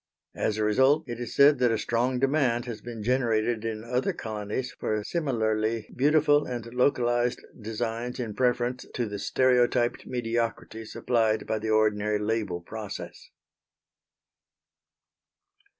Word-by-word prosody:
As 110 - -1
a 110 - 0
result 130 +8 +3
it 120 -1 -5
is 120 -2 -5
said 140 -1 +6
that 125 -1 +4
a 115 - +1
strong 120 +4 0
demand 135 -3 +1
has 115 -3 -6
been 115 -2 -7
generated 115 -2 +1
in 110 -1 -4
other 125 +2 -1
colonies 110 +3 -4
for 105 -1 -2
similarly 110 -7 -1
beautiful 145 +1 +3
and 120 -2 -4
localised 120 -2 +2 0.2
designs 115 +3 -3
in 115 -4 -3
preference 125 +1 0
to 120 - 0
the 105 -2 -5
stereotyped 125 -1 +2
mediocrity 115 -2 -2
supplied 110 -1 0
by 110 - -1
the 110 +1 -4
ordinary 105 -1 +2
label 105 -4 -2
process. 105 +3 -8
115 Hz, 130 wpm, -27 LUFS, 110-125 Hz, 0.2 s, said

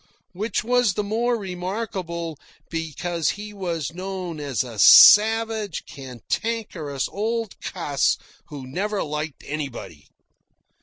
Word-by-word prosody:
Which 210 +4 -2
was 245 -4 +2
the 210 - -1
more 230 +4 0
remarkable, 180 -4 -4 0.3
because 165 0 -2
he 210 +1 -5
was 170 -7 -3
known 185 -3 -5
as 140 -5 -1
a 115 -4 -9
savage, 220 - +7
cantankerous 145 - -4
old 225 +1 -3
cuss 150 -7 0 0.3
who 140 -3 -8
never 195 +10 -2
liked 150 0 -5
anybody. 135 - -6
180 Hz, 105 wpm, -23 LUFS, 150-210 Hz, 0.3 s, savage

